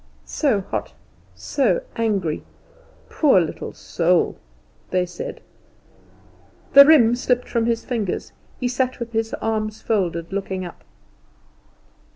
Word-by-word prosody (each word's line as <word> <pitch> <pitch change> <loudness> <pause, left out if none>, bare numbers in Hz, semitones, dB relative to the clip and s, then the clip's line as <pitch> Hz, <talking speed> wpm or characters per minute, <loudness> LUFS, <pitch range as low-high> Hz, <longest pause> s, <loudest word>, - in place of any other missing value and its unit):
"So 265 -10 +1
hot, 190 - -5 0.4
so - - 0
angry, 200 -9 -1 0.7
poor 280 - +4
little 165 -3 -3
soul?" 175 +1 +1 0.5
they 185 -1 +1
said. 175 0 -7 1.3
The 280 0 +11
riem 240 -7 +6
slipped 250 0 0
from 230 -1 0
his 230 -1 -1
fingers; 220 -7 -3 0.3
he 250 - 0
sat 255 +1 -1
with 235 -1 -5
his 225 0 -1
arms 215 -1 -2
folded, 175 -5 -1
looking 190 -2 -3
up. 175 - -11
220 Hz, 115 wpm, -22 LUFS, 185-245 Hz, 1.3 s, The